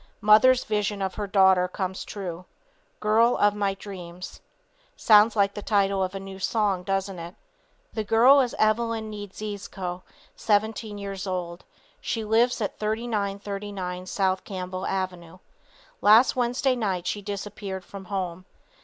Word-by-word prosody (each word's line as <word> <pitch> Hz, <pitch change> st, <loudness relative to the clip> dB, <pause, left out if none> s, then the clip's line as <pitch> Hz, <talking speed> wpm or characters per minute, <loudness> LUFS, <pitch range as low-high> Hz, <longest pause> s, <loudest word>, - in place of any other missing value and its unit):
Mother's 220 Hz, +5 st, +6 dB
vision 210 Hz, -1 st, -1 dB
of 190 Hz, -1 st, -2 dB
her 205 Hz, -1 st, -4 dB
daughter 190 Hz, -2 st, +4 dB
comes 185 Hz, 0 st, -4 dB
true. 180 Hz, -3 st, -6 dB, 0.5 s
Girl 225 Hz, +3 st, +3 dB
of 205 Hz, 0 st, +3 dB
my 200 Hz, -1 st, -1 dB
dreams. 180 Hz, -3 st, -9 dB, 0.6 s
Sounds 215 Hz, 0 st, +5 dB
like 200 Hz, -1 st, +2 dB
the 205 Hz, -, -6 dB
title 200 Hz, -2 st, +1 dB
of 185 Hz, +1 st, -3 dB
a -, -, -3 dB
new 195 Hz, 0 st, -9 dB
song, 200 Hz, -2 st, 0 dB
doesn't 195 Hz, 0 st, -2 dB
it. 170 Hz, +2 st, -8 dB, 0.6 s
The 220 Hz, -, -2 dB
girl 235 Hz, +6 st, +6 dB
is 245 Hz, -3 st, -2 dB
Evelyn 220 Hz, 0 st, +1 dB
Niedziezko, 200 Hz, -3 st, -6 dB, 0.3 s
17 215 Hz, 0 st, 0 dB
years 200 Hz, -1 st, -5 dB
old. 180 Hz, -2 st, -4 dB, 0.3 s
She 225 Hz, -, -3 dB
lives 230 Hz, +3 st, +2 dB
at 205 Hz, -, -3 dB
3939 200 Hz, -4 st, -3 dB
South 190 Hz, -1 st, 0 dB
Campbell 185 Hz, -1 st, -5 dB
avenue. 185 Hz, -2 st, -4 dB, 0.6 s
Last 220 Hz, +5 st, +6 dB
Wednesday 255 Hz, +2 st, +1 dB
night 195 Hz, -7 st, -2 dB
she 205 Hz, -, -2 dB
disappeared 200 Hz, -2 st, -6 dB
from 195 Hz, -1 st, -10 dB
home. 185 Hz, -2 st, -4 dB
200 Hz, 135 wpm, -25 LUFS, 185-215 Hz, 0.6 s, Mother's